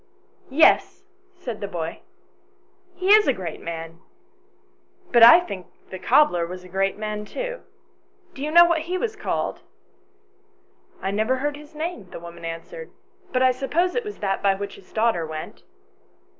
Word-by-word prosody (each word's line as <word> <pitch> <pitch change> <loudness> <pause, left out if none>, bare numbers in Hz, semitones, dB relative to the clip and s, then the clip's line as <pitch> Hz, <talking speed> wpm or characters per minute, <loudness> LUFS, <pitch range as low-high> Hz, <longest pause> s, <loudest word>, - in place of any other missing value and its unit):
" - - -33 0.2
Yes," - - +2 0.3
said 245 -12 -7
the 200 - -3
boy, 165 -4 -5 0.5
" 370 -1 -38
he 375 +2 +4
is 430 0 +6
a 270 - +4
great 175 -7 -7
man; 165 0 -7 1.1
but 235 - +5
I 235 +9 +10
think 195 - -7 0.2
the 185 - -6
cobbler 205 - +3
was 180 +1 -8
a - - -12
great 195 +2 0
man 210 0 -4
too. - - -5 0.7
Do 270 - -10
you 295 - -2
know 345 +2 +8
what 340 -1 +2
he 365 - 0
was 435 +2 -2
called? 425 - -3 0.5
" - - -39
" - - -34
I 195 - -1
never 220 +5 +1
heard 290 +3 -2
his 300 +1 -14
name," 305 - -5
the - - -8
woman 170 0 -10
answered, 460 - -7 0.4
"but 255 0 +2
I 255 - +5
suppose 320 +8 0
it 485 - -1
was 420 -1 -7
that 195 -1 -1
by 195 -1 +3
which 200 0 -6
his 190 - -16
daughter 220 -6 +1
went." 155 -1 -7
230 Hz, 180 wpm, -23 LUFS, -, 1.1 s, I